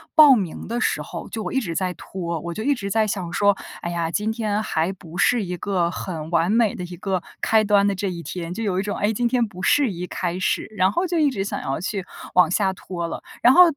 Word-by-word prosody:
报 300 Hz, -4 st, +9 dB
名 190 Hz, -8 st, -3 dB
的 235 Hz, +2 st, -2 dB
时 -, -, +1 dB
候， -, -, -7 dB
就 225 Hz, -, -4 dB
我 -, -, -4 dB
一 265 Hz, -, +3 dB
直 175 Hz, -8 st, -3 dB
在 180 Hz, +1 st, 0 dB
拖， 170 Hz, -1 st, -5 dB
我 170 Hz, +1 st, -4 dB
就 215 Hz, -, -5 dB
一 285 Hz, +3 st, +2 dB
直 200 Hz, -5 st, -5 dB
在 220 Hz, +1 st, +2 dB
想 185 Hz, -4 st, -3 dB
说， 200 Hz, +1 st, +4 dB, 0.3 s
哎 170 Hz, -, -3 dB
呀， 170 Hz, -1 st, -1 dB
今 210 Hz, +4 st, 0 dB
天 215 Hz, -2 st, -1 dB
还 165 Hz, -4 st, 0 dB
不 175 Hz, -2 st, -11 dB
是 240 Hz, +1 st, +3 dB
一 180 Hz, 0 st, -3 dB
个 180 Hz, -2 st, 0 dB
很 165 Hz, -3 st, -5 dB
完 170 Hz, +2 st, +2 dB
美 225 Hz, -2 st, +3 dB
的 180 Hz, -, -5 dB
一 175 Hz, 0 st, -7 dB
个 185 Hz, -1 st, -2 dB, 0.2 s
开 220 Hz, -1 st, +4 dB
端 205 Hz, -1 st, +4 dB
的 200 Hz, -, +1 dB
这 195 Hz, +1 st, -2 dB
一 170 Hz, -1 st, -6 dB
天， 175 Hz, 0 st, -5 dB
就 225 Hz, -, -4 dB
有 185 Hz, -2 st, 0 dB
一 -, -, 0 dB
种， 205 Hz, 0 st, -3 dB
哎， 210 Hz, +2 st, +1 dB
今 240 Hz, +2 st, +1 dB
天 240 Hz, -1 st, +2 dB
不 185 Hz, -3 st, -10 dB
适 285 Hz, +3 st, +4 dB
宜 180 Hz, -2 st, -4 dB
开 180 Hz, 0 st, -3 dB
始， 185 Hz, -, 0 dB
然 185 Hz, 0 st, +3 dB
后 350 Hz, -, 0 dB
就 345 Hz, -, -1 dB
一 295 Hz, -3 st, +3 dB
直 195 Hz, -5 st, -2 dB
想 -, -, -3 dB
要 135 Hz, +2 st, -2 dB
去 190 Hz, +1 st, -3 dB, 0.3 s
往 180 Hz, -2 st, +5 dB
下 190 Hz, 0 st, +2 dB
拖 175 Hz, -2 st, -5 dB
了。 -, -, -6 dB, 0.2 s
然 245 Hz, -, +7 dB
后 360 Hz, -, +10 dB
195 Hz, 285 characters per minute, -23 LUFS, 175-220 Hz, 0.3 s, 后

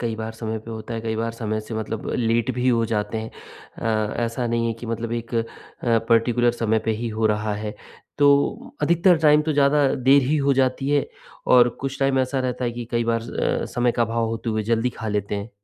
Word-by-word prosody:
कई 115 Hz, -2 st, -2 dB
बार 110 Hz, 0 st, -5 dB
समय 110 Hz, 0 st, -4 dB
पे 110 Hz, +2 st, -11 dB
होता 110 Hz, +1 st, -6 dB
है, 115 Hz, -, -3 dB
कई 110 Hz, 0 st, -3 dB
बार 115 Hz, +1 st, -1 dB
समय 110 Hz, -2 st, -3 dB
से 110 Hz, +1 st, -8 dB
मतलब 110 Hz, 0 st, -4 dB
लेट 115 Hz, 0 st, +1 dB
भी 125 Hz, +1 st, 0 dB
हो 115 Hz, -2 st, +3 dB
जाते 110 Hz, 0 st, -2 dB
हैं 110 Hz, +1 st, -6 dB, 0.5 s
अ, 110 Hz, -1 st, -1 dB
ऐसा 115 Hz, +1 st, -2 dB
नहीं 115 Hz, 0 st, 0 dB
है 115 Hz, -, 0 dB
कि 120 Hz, -, -7 dB
मतलब 115 Hz, 0 st, -3 dB
एक 115 Hz, 0 st, -4 dB
अ, 115 Hz, -1 st, +1 dB, 0.6 s
पर्टिकुलर 120 Hz, +1 st, +3 dB
समय 115 Hz, -2 st, 0 dB
पे 115 Hz, -, +1 dB
ही 120 Hz, -, -1 dB
हो 110 Hz, 0 st, 0 dB
रहा 105 Hz, 0 st, 0 dB
है। 105 Hz, 0 st, -5 dB, 0.4 s
तो 175 Hz, -, +2 dB
अधिकतर 175 Hz, +1 st, +4 dB
टाइम 150 Hz, -1 st, +5 dB
तो 155 Hz, -, -1 dB
ज़्यादा 145 Hz, 0 st, +3 dB
देर 135 Hz, +2 st, +4 dB
ही 145 Hz, +5 st, +1 dB
हो 140 Hz, -1 st, +2 dB
जाती 130 Hz, +1 st, +1 dB
है 145 Hz, -1 st, +2 dB, 0.5 s
और 120 Hz, -1 st, +7 dB
कुछ 135 Hz, 0 st, -4 dB
टाइम 135 Hz, -1 st, +2 dB
ऐसा 130 Hz, +1 st, 0 dB
रहता 125 Hz, 0 st, -2 dB
है 120 Hz, -, 0 dB
कि 120 Hz, 0 st, -6 dB
कई 120 Hz, -1 st, 0 dB
बार 115 Hz, 0 st, +1 dB, 0.4 s
अ, -, -, -2 dB
समय 120 Hz, -1 st, +2 dB
का 120 Hz, -, +1 dB
अभाव 115 Hz, 0 st, 0 dB
होते 115 Hz, +1 st, -3 dB
हुए 110 Hz, -1 st, -1 dB
जल्दी 115 Hz, +3 st, 0 dB
खा 110 Hz, -, -3 dB
लेते 105 Hz, -1 st, -2 dB
हैं। 100 Hz, +2 st, -5 dB
115 Hz, 230 wpm, -23 LUFS, 110-130 Hz, 0.6 s, और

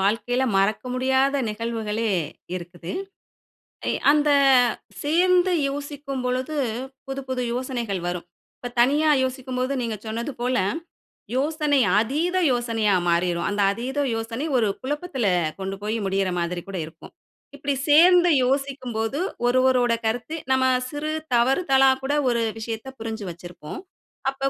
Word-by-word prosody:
வாழ்க்கையில 235 Hz, +6 st, +1 dB
மறக்க 195 Hz, +2 st, +2 dB
முடியாத 265 Hz, +2 st, +2 dB
நிகழ்வுகளே 225 Hz, 0 st, -2 dB, 0.4 s
இருக்குது. 175 Hz, -1 st, -7 dB, 1.0 s
எ -, -, +2 dB, 0.2 s
அந்த 295 Hz, 0 st, +3 dB, 0.7 s
சேர்ந்து 360 Hz, +4 st, +3 dB, 0.2 s
யோசிக்கும் 280 Hz, -1 st, -5 dB
பொழுது, 255 Hz, +4 st, -1 dB, 0.5 s
புது 270 Hz, 0 st, -4 dB
புது 255 Hz, -1 st, -1 dB
யோசனைகள் 240 Hz, -6 st, -3 dB
வரும். 175 Hz, -1 st, -4 dB, 0.3 s
இப்ப 245 Hz, -, -6 dB
தனியா 295 Hz, +5 st, +4 dB
யோசிக்கும்போது 255 Hz, 0 st, -2 dB
நீங்க 230 Hz, -2 st, -2 dB
சொன்னது 230 Hz, +5 st, -3 dB
போல, 250 Hz, +1 st, 0 dB, 0.8 s
யோசனை 295 Hz, 0 st, +2 dB, 0.2 s
அதீத 310 Hz, +11 st, 0 dB
யோசனையா 230 Hz, -4 st, +1 dB, 0.2 s
மாறிரும். 170 Hz, 0 st, +1 dB
அந்த 205 Hz, 0 st, -1 dB
அதீத 250 Hz, +7 st, -5 dB, 0.2 s
யோசனை 225 Hz, +5 st, -3 dB
ஒரு 225 Hz, -3 st, +2 dB
குழப்பத்துல 290 Hz, -, -3 dB, 0.3 s
கொண்டு 195 Hz, 0 st, -3 dB
போய் 215 Hz, +2 st, -1 dB
முடியற 195 Hz, 0 st, 0 dB
மாரி 175 Hz, +1 st, -2 dB
கூட 190 Hz, -, -4 dB
இருக்கும். 160 Hz, -, -13 dB, 0.4 s
இப்டி 285 Hz, 0 st, -2 dB, 0.2 s
சேர்ந்து 355 Hz, +3 st, +7 dB, 0.2 s
யோசிக்கும்போது 260 Hz, -2 st, -1 dB, 0.3 s
ஒருவரோட 250 Hz, -1 st, +3 dB
கருத்து 245 Hz, +8 st, -2 dB, 0.2 s
நம்ம 260 Hz, 0 st, +3 dB, 0.2 s
சிறு 300 Hz, +1 st, -3 dB, 0.2 s
தவறுதலா 270 Hz, +2 st, +4 dB
கூட 280 Hz, +2 st, 0 dB, 0.2 s
ஒரு 235 Hz, -1 st, +1 dB, 0.2 s
விஷயத்த 225 Hz, +2 st, -5 dB
புரிஞ்சு 225 Hz, -1 st, -5 dB
வச்சிருப்போம். 175 Hz, -, -9 dB, 0.5 s
அப்ப 270 Hz, 0 st, -1 dB
250 Hz, 120 wpm, -24 LUFS, 220-280 Hz, 1.0 s, சேர்ந்து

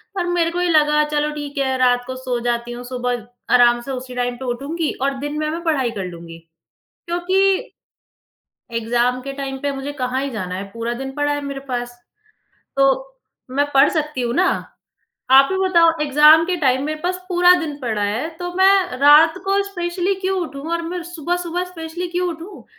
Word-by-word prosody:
पर 360 Hz, -, -1 dB
मेरे 345 Hz, -1 st, +1 dB
को 355 Hz, +1 st, -2 dB
ये 360 Hz, -, +1 dB
लगा 300 Hz, -1 st, +4 dB
चलो 300 Hz, 0 st, +1 dB
ठीक 290 Hz, -1 st, -7 dB
है, 265 Hz, -1 st, 0 dB
रात 245 Hz, -1 st, +3 dB
को 260 Hz, -, -5 dB
सो 255 Hz, -2 st, -3 dB
जाती 240 Hz, 0 st, -1 dB
हूँ, 240 Hz, +1 st, -7 dB
सुबह 245 Hz, -2 st, -3 dB, 0.3 s
आराम 240 Hz, -1 st, +5 dB
से 270 Hz, -, -7 dB
उसी 255 Hz, -1 st, -6 dB
टाइम 245 Hz, 0 st, -1 dB
पे 260 Hz, -, -7 dB
उठूँगी 285 Hz, +6 st, -2 dB
और 275 Hz, 0 st, 0 dB
दिन 290 Hz, +2 st, -4 dB
में 305 Hz, 0 st, -1 dB
मैं 335 Hz, +2 st, -4 dB
पढ़ाई 280 Hz, -8 st, 0 dB
कर 195 Hz, -4 st, -5 dB
लूँगी। 170 Hz, -1 st, -9 dB, 0.7 s
क्योंकि 375 Hz, +3 st, +1 dB, 1.1 s
एग्ज़ाम 240 Hz, +2 st, 0 dB
के 275 Hz, +1 st, -5 dB
टाइम 275 Hz, -1 st, -5 dB
पे 285 Hz, -, -1 dB
मुझे 275 Hz, +1 st, -5 dB
कहाँ 260 Hz, -1 st, -2 dB
ही 275 Hz, -, -3 dB
जाना 185 Hz, -6 st, -4 dB
है, 190 Hz, +2 st, -4 dB
पूरा 230 Hz, +2 st, -4 dB
दिन 270 Hz, +2 st, -6 dB
पड़ा 290 Hz, 0 st, 0 dB
है 290 Hz, -, -2 dB
मेरे 275 Hz, -1 st, -5 dB
पास, 245 Hz, -1 st, -4 dB, 0.8 s
तो 275 Hz, -, +2 dB, 0.4 s
मैं 285 Hz, +3 st, +1 dB
पढ़ 275 Hz, +2 st, +6 dB
सकती 300 Hz, -4 st, -2 dB
हूँ 240 Hz, 0 st, -1 dB
ना। 370 Hz, +4 st, +3 dB, 0.8 s
आप 270 Hz, +1 st, +7 dB
ही -, -, 0 dB
बताओ 340 Hz, -3 st, +4 dB
एग्ज़ाम 300 Hz, +2 st, +6 dB
के 370 Hz, -, 0 dB
टाइम 265 Hz, -3 st, +1 dB
मे 310 Hz, -, -2 dB
पास 365 Hz, +1 st, -1 dB
पूरा 355 Hz, -1 st, +5 dB
दिन 305 Hz, -3 st, -4 dB
पड़ा 220 Hz, -4 st, -2 dB
है, 215 Hz, +9 st, -1 dB
तो 355 Hz, 0 st, -5 dB
मैं 380 Hz, -7 st, +4 dB
रात 300 Hz, +3 st, +7 dB
को 395 Hz, +1 st, +2 dB
स्पेशली 360 Hz, 0 st, -2 dB
क्यों 380 Hz, 0 st, 0 dB
उठूँ? 280 Hz, -5 st, -6 dB
और 335 Hz, 0 st, -1 dB
मैं 345 Hz, +1 st, -4 dB
सुबह-सुबह 350 Hz, +1 st, -3 dB
स्पेशली 345 Hz, 0 st, -6 dB
क्यों 355 Hz, +1 st, -1 dB
उठूँ? 340 Hz, +4 st, -8 dB
290 Hz, 195 wpm, -20 LUFS, 250-345 Hz, 1.1 s, आप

